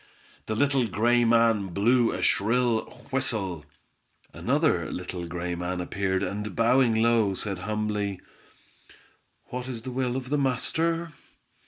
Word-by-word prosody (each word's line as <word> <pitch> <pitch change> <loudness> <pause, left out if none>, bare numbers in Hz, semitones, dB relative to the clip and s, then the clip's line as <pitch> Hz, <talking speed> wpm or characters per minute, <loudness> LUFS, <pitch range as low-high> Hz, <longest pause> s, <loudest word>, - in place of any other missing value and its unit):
The 110 - -1
little 135 0 +2
gray 120 +4 +2
man 115 -3 +3
blew 120 +3 +3
a - - -3
shrill 115 +2 +2 0.3
whistle. 105 - 0 0.7
Another - - +1
little 90 -1 -5
gray 90 +1 -4
man 90 +1 -3
appeared, 95 +1 -1
and 105 0 -4
bowing 120 0 +3
low, 110 -3 +3
said 100 -1 -3
humbly:— 105 -1 -2 1.3
"What 125 0 -5
is 120 -3 -6
the 130 - -5
will 125 -1 -1
of 130 -1 -4
the 150 - +2
master?" 160 +6 0
115 Hz, 130 wpm, -26 LUFS, 100-125 Hz, 1.3 s, man